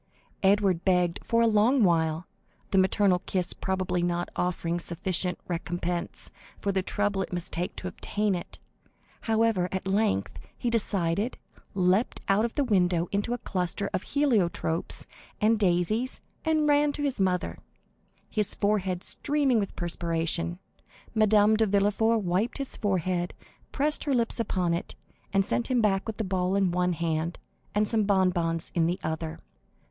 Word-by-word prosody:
Edward 195 -3 +3
begged 180 -2 +2
for 230 0 +2
a - - +4
long 225 +4 +4
while, 165 -2 +2 0.5
the 195 - +4
maternal 190 0 +3
kiss 180 -2 -1
probably 185 -2 -1
not 175 0 -1
offering 175 -1 -1
sufficient 180 +1 -2
recompense 175 0 -3 0.3
for 200 - 0
the 190 -1 +1
trouble 205 +1 0
he - - -2
must 175 -1 -4
take 175 +2 -3
to 185 - -5
obtain 205 +2 -1
it; 175 - -6 0.7
however 220 -5 +2
at 190 0 -3
length 190 - 0 0.2
he 240 - -1
decided, 200 -1 0 0.4
leaped 190 +4 +2
out 200 +2 +3
of 235 - -4
the 290 - +2
window 180 -7 +2
into 205 +3 -1
a 245 - 0
cluster 185 -1 -2
of - - 0
heliotropes 205 - 0 0.3
and 220 +1 +3
daisies, 200 +6 +1 0.2
and 310 -1 +2
ran 290 0 +4
to 290 - -3
his 275 -5 -1
mother, 185 -1 0 0.7
his 210 -2 -1
forehead 190 -3 0
streaming 280 -5 +1
with 200 - -3
perspiration. 170 0 -1 0.6
Madame 215 -1 +4
de 220 0 +2
Villefort 205 +3 +2
wiped 185 +7 0
his 275 -2 -4
forehead, 185 -3 -1 0.4
pressed 295 +2 +2
her 280 -3 +1
lips 235 0 0
upon 180 -6 0
it, 170 - -4 0.4
and 195 0 +2
sent 235 - 0
him 255 -2 +2
back 200 -2 +1
with 220 - -4
the 220 - -1
ball 185 -1 0
in 195 -3 +2
one 180 0 +1
hand 165 0 -2 0.4
and 210 0 +3
some 220 0 +2
bonbons 180 -5 +1
in 165 -2 +2
the 175 +2 -1
other. 160 0 -3
190 Hz, 155 wpm, -27 LUFS, 175-220 Hz, 0.7 s, a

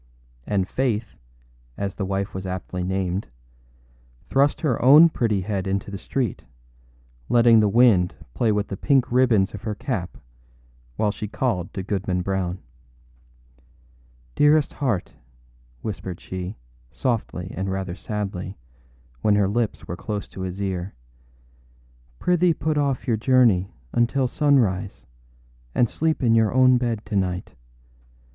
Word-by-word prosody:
And 95 -3 0
Faith, 115 - -2 0.6
as 100 -1 -3
the 100 - -3
wife 95 0 -2
was 95 0 -5
aptly 90 0 -4
named, 95 +1 -2 1.0
thrust 140 +7 +2
her 140 -8 0
own 150 +6 +8
pretty 110 -9 0
head 95 -1 -3
into 100 +1 -2
the 100 - -4
street, 125 -7 -2 0.9
letting 115 -1 +6
the 105 -1 +3
wind 105 -5 +4 0.2
play 110 - +1
with 105 -1 -1
the 95 - -4
pink 135 +1 +2
ribbons 120 -6 +3
of 105 - -7
her 110 -1 -3
cap 115 -8 -4 0.8
while 105 - +1
she 105 - -6
called 105 -5 -2
to 95 - -3
Goodman 95 -2 -2
Brown. 95 -1 -2 1.8
âDearest 150 0 +4
heart,â 125 -11 -2 0.7
whispered 95 -4 -5
she, 95 +2 -6 0.3
softly 105 - -3
and 95 +1 -3
rather 95 -2 -3
sadly, 100 -2 -5 0.6
when 105 -1 +3
her 100 -1 +3
lips 110 +2 -2
were 90 - -4
close 105 +2 -5
to 95 - -9
his 95 +1 -5
ear, 95 -1 -3 1.2
âprithee 180 -1 +2
put 155 -1 -1
off 140 -3 0
your 115 -3 +2
journey 110 -6 +3 0.2
until 125 +3 +2
sunrise 115 -10 +1 0.7
and 120 - +4
sleep 160 +4 -1
in 115 -2 +4
your 110 -2 +3
own 130 0 +5
bed 115 -3 -2
to 105 -1 -4
night. 90 -1 -1
105 Hz, 135 wpm, -23 LUFS, 95-125 Hz, 1.8 s, own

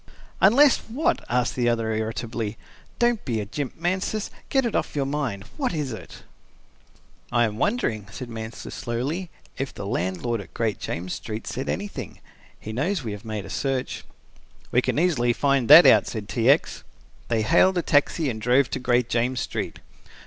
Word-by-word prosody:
"Unless 260 +8 +6
what?" 305 +10 0
asked 125 0 +1
the 120 -2 +2
other, 115 -1 0
irritably. 110 0 -3 0.4
"Don't 240 -2 +2
be 115 -4 -1
a 105 - -3
jimp, 130 +5 -4
Mansus. 185 +5 -1 0.2
Get 270 -2 +2
it 235 - -1
off - - -1
your 140 -2 0
mind. 135 -8 -2
What - - -1
is 145 -5 -2
it?" 110 - -10 1.1
"I 120 -1 +3
am 110 -2 -1
wondering," 115 - 0
said 125 +3 -7
Mansus 110 -1 -7
slowly, 135 +9 -3 0.3
"if 135 0 -2
the - - -7
landlord 100 +5 -2
at - - -15
Great 110 -3 -1
James 90 +2 -4
Street 110 0 -6
said 130 - -4
anything. 190 - -5 0.4
He 110 - -7
knows 155 - -1
we 110 - -4
have 105 0 -7
made 110 -2 -4
a - - -9
search." 135 -2 -2 0.7
"We 125 - +4
can - - -1
easily 145 -8 +2
find 140 -2 +1
that 155 +4 +10
out," - - +6
said 110 -3 -5
T. 120 +2 +1
X. 145 +4 +2 0.4
They 115 -2 +1
hailed 185 - +4
a 175 - +1
taxi 145 +2 +2
and 110 -4 -3
drove 125 +3 +3
to - - -2
Great 125 -1 +2
James 120 +1 0
Street. - - -4
125 Hz, 180 wpm, -24 LUFS, 110-150 Hz, 1.1 s, that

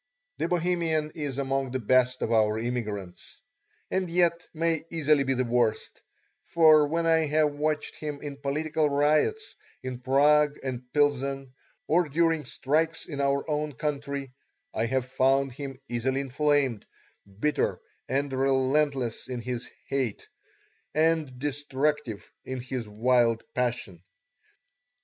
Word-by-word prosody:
The 165 - 0
Bohemian 170 -3 0
is 145 -5 -4
among 135 -1 -1
the 130 +1 -2
best 130 +2 +2
of - - -1
our 110 -1 +3
immigrants, 110 -6 -5 0.5
and 185 -2 0
yet 170 0 +1
may 165 -1 0
easily 150 -3 +3
be 135 0 0
the 130 - +1
worst, 120 -2 0 0.4
for 155 -3 +5
when 165 +2 0
I 160 -1 +3
have 150 0 +2
watched 150 +1 -2
him 150 -2 -5
in 145 -1 -7
political 150 +2 0
riots 155 - +1 0.3
in 130 -1 -5
Prague 145 +3 +4
and 125 -2 -5
Pilsen, 140 -2 0 0.3
or 170 0 +2
during 165 0 +1
strikes 160 +4 0
in 140 -3 -4
our 140 0 +1
own 150 -1 -1
country 140 0 -3 0.4
I 115 - 0
have 130 +1 0
found 135 +1 +2
him 135 0 -7
easily 130 +3 -1
inflamed, 140 -4 0 0.5
bitter 150 +5 0 0.3
and 135 +1 -1
relentless 135 -1 +1
in 125 -2 -4
his 120 0 -4 0.2
hate, 130 -6 -2 0.7
and 155 -4 +1
destructive 145 -3 -2 0.2
in 130 0 -5
his 125 -3 -5
wild 115 +1 +2
passion. 120 -8 -2
140 Hz, 130 wpm, -27 LUFS, 125-150 Hz, 0.7 s, for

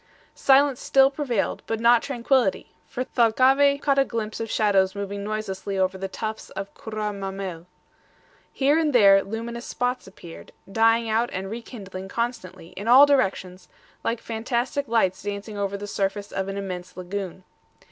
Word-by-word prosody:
Silence 275 -1 +3
still 270 0 +4
prevailed, 265 -8 -2
but 225 - -2
not 235 0 +5
tranquillity; 250 -5 0 0.2
for 255 - -3
Thalcave 265 +5 +3
caught 275 -2 +2
a - - +5
glimpse 225 -4 -4
of 225 0 -4
shadows 195 -3 +2
moving 200 0 -4
noiselessly 200 -2 -4
over 190 0 +1
the 195 0 -4
tufts 220 +3 -6
of 195 +1 -7
CURRA 215 -1 -4
MAMMEL. 190 -3 -6 0.8
Here 285 +3 +2
and 305 -3 +1
there 195 -4 +7
luminous 230 +3 -6
spots 250 -2 -2
appeared, 175 -3 -12 0.2
dying 225 +2 +3
out 225 +2 +1
and 190 +1 -5
rekindling 200 -5 -8
constantly, 230 -8 -4
in 200 +4 -8
all 260 +4 +9
directions, 190 -9 0 0.4
like 230 0 -1
fantastic 240 +5 -2
lights 190 -5 +1
dancing 205 +1 -5
over 200 -1 -2
the 205 - -6
surface 200 0 -3
of 190 0 -3
an 195 0 -4
immense 180 -2 -6
lagoon. 185 0 -5
215 Hz, 155 wpm, -24 LUFS, 195-240 Hz, 0.8 s, all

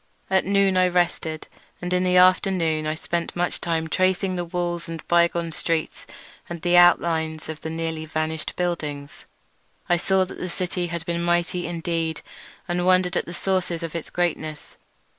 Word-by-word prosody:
At 190 - +3
noon 195 -1 +3
I 185 0 +5
rested, 175 -3 -1 0.3
and 180 0 -3
in 180 0 +2
the 180 0 +3
afternoon 180 -4 +3
I 155 - -1
spent 170 +1 -3
much 175 0 -1
time 165 -1 -1
tracing 185 +2 +1
the 175 - -2
walls, 175 -1 -3
and 165 -1 -5
the - - -12
bygone 170 -1 +2
streets, 160 0 -2 0.4
and 170 0 -5
the 175 0 +3
outlines 165 -3 +4
of 155 -1 -6
the 160 - -4
nearly 160 -1 -3
vanished 155 0 -3
buildings. 155 -4 -4 0.6
I 175 -2 +3
saw 190 +2 +2
that 185 - -10
the 180 - -4
city 180 0 -2
had 170 -1 -5
been 170 -1 -1
mighty 175 +1 0
indeed, 165 -2 -2 0.5
and 175 0 -1
wondered 185 0 +3
at - - 0
the 170 - -6
sources 180 -3 -1
of 165 - -4
its 165 -2 -5
greatness. 155 -3 -3
175 Hz, 175 wpm, -24 LUFS, 160-180 Hz, 0.6 s, I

